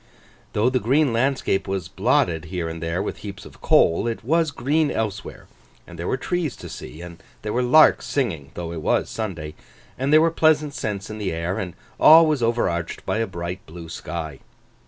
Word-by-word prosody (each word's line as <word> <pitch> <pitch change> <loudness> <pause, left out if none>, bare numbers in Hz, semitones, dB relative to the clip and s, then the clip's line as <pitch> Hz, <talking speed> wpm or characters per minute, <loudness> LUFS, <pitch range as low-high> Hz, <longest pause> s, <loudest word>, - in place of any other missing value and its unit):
Though 110 +5 +2
the 130 - +1
green 135 +3 +2
landscape 130 -4 0
was 95 -3 -3
blotted 85 -2 +1
here 85 0 -4
and 80 0 -6
there 85 +3 -2
with - - -4
heaps 105 0 -9
of - - -15
coal, 85 +7 +3
it 115 -1 -3
was 160 +5 +2
green 145 +3 0
elsewhere, 105 -2 -4 0.4
and 85 -1 -12
there 85 - -3
were - - 0
trees 170 0 -2
to - - -10
see, 80 - -9
and 85 -1 -11 0.2
there 105 - -3
were 125 - +1
larks 155 +6 +5
singing 90 - -2
(though 85 -1 -5
it 85 -2 -5
was - - 0
Sunday), 85 -9 -5 0.5
and 135 +2 0
there 155 - +7
were 165 +1 +3
pleasant 155 -2 +2
scents 105 -3 -4
in 110 - -7
the 100 -3 -2
air, 85 +3 -2
and 90 -2 -5 0.2
all 165 +2 +9
was 155 -4 0
over 115 +1 +1
arched 85 -1 -4
by 110 - -1
a 115 - 0
bright 85 0 -6
blue 80 0 -10
sky. 80 -3 -6
105 Hz, 200 wpm, -23 LUFS, 85-135 Hz, 0.5 s, all